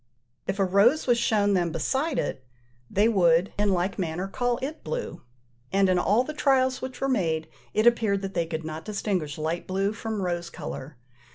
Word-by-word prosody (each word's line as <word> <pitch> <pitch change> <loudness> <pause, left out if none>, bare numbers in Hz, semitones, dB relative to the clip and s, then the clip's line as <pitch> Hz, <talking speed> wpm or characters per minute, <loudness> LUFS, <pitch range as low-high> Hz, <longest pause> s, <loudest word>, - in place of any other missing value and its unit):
If 190 - -1
a 195 - +3
rose 200 +11 +4
was 240 -2 +3
shown 210 -4 +2
them 175 -3 +1
beside 265 - -1
it, 130 - -2 0.5
they 205 +3 +3
would, 175 -4 +3
in 205 0 +3
like 190 +1 0
manner, 175 +1 -2
call 245 +4 -1
it 300 +4 -5
blue; - - -4 0.5
and 195 0 +3
in 180 -1 +3
all 210 +7 +3
the 305 - -6
trials 260 -3 +2
which 260 -1 -6
were 270 - 0
made, 165 -11 0 0.3
it 215 - +3
appeared 220 -4 +3
that 195 0 -4
they 170 -1 0
could 160 -1 -4
not 155 0 -5
distinguish 190 -8 -2
light 160 +2 -3
blue 195 +2 0
from 220 -2 -4
rose 175 -1 -2
colour. 150 -4 -7
195 Hz, 190 wpm, -26 LUFS, 175-235 Hz, 0.5 s, rose